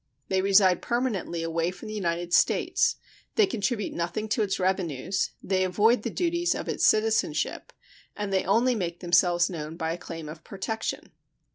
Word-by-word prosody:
They 190 0 +2
reside 190 -2 +4
permanently 230 -9 -2
away 165 +1 0
from 180 +4 -9
the 215 - -6
United 175 -3 -2
States, 470 0 +3 0.4
they 435 - +5
contribute 220 - -2
nothing 175 +6 -3
to 220 - +1
its 195 -2 0
revenues, 185 -2 -1
they 185 -1 +1
avoid 210 +6 +3
the 230 - -3
duties 345 +4 0
of - - -5
its - - +2
citizenship, 220 +1 +1 0.4
and 205 -1 -3
they 190 - +2
only 230 +7 +3
make 175 -6 -3
themselves 175 0 +3
known 160 -2 -6
by 165 -1 -1
a 175 - -7
claim 165 -2 -7
of 155 +1 -9
protection. 210 +3 -4
190 Hz, 165 wpm, -27 LUFS, 175-220 Hz, 0.4 s, they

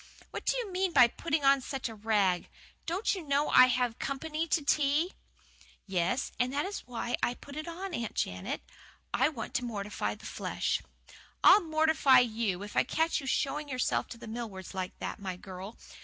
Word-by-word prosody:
"What - - -6
do - - +2
you 460 -6 -3
mean 370 -1 0
by 245 - +8
putting 295 +3 -2
on 275 0 +5
such 265 0 -4
a 225 - -7
rig! 205 -4 +1 0.4
Don't 360 +6 0
you 380 - -4
know 290 -1 +1
I 255 - +8
have 245 -2 0
company 310 +4 -2
to 310 -2 +1
tea?" 300 +5 +2 0.7
"Yes, 190 +6 0
and 250 +1 +1
that 285 +2 0
is 400 +1 -4
just - - -19
why 240 -1 -2
I 245 - +1
put 280 +2 -12
it 310 +1 -5
on, 360 +2 -5
Aunt 230 -7 -3
Janet. 90 0 -2 0.5
I 260 +4 +3
want 245 -8 -6
to 250 - 0
mortify 210 -4 -3
the - - -14
flesh - - -2 0.3
" - - -22
"I'll 395 +3 +9
'mortify' 315 -4 +4
you, 220 -5 -1
if 205 - -9
I - - +5
catch 320 -1 0
you 270 - -7
showing 290 +2 -1
yourself 255 -2 0
to 235 - -9
the 235 - -10
Millwards 220 -5 -6
like 185 -1 -4
that, - - -5
my 190 -2 -4
girl! 190 +4 -9
255 Hz, 200 wpm, -30 LUFS, 220-310 Hz, 0.7 s, I'll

